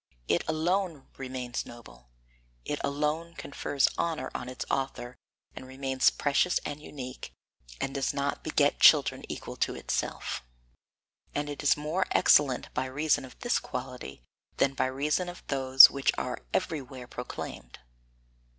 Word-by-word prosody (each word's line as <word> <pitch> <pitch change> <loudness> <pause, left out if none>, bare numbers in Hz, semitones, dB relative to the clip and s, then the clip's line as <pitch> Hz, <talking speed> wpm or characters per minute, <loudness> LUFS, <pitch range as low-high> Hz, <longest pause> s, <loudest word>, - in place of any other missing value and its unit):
It 85 - +2
alone 165 -1 0
remains 130 -2 -4
noble, - - -14 0.6
it 145 - -2
alone 150 +4 -1
confers 140 -2 0
honour 165 -2 -1
on 125 - -5
its 130 - -5
author 135 -2 -2 0.4
and 130 - -9
remains 130 0 +2
precious 145 +5 +1
and 145 0 -5
unique, 130 -4 -8 0.5
and 135 - -2
does 135 -2 0
not 140 0 -2
beget - - +2
children - - +6
equal - - -7
to - - 0
itself. - - -3 0.9
And 145 0 -2
it 145 - -6
is 145 - +4
more 160 +5 -1
excellent 135 -4 +4
by - - -1
reason 145 +3 +1
of 130 - -14
this 240 - +1
quality 125 - -7 0.3
than 135 0 +2
by 130 - 0
reason 150 +7 -1
of 175 - -10
those 135 -1 +8
which 140 -1 +1
are - - -3
everywhere 130 -4 -3
proclaimed. 120 - -7
135 Hz, 140 wpm, -29 LUFS, 130-150 Hz, 0.9 s, those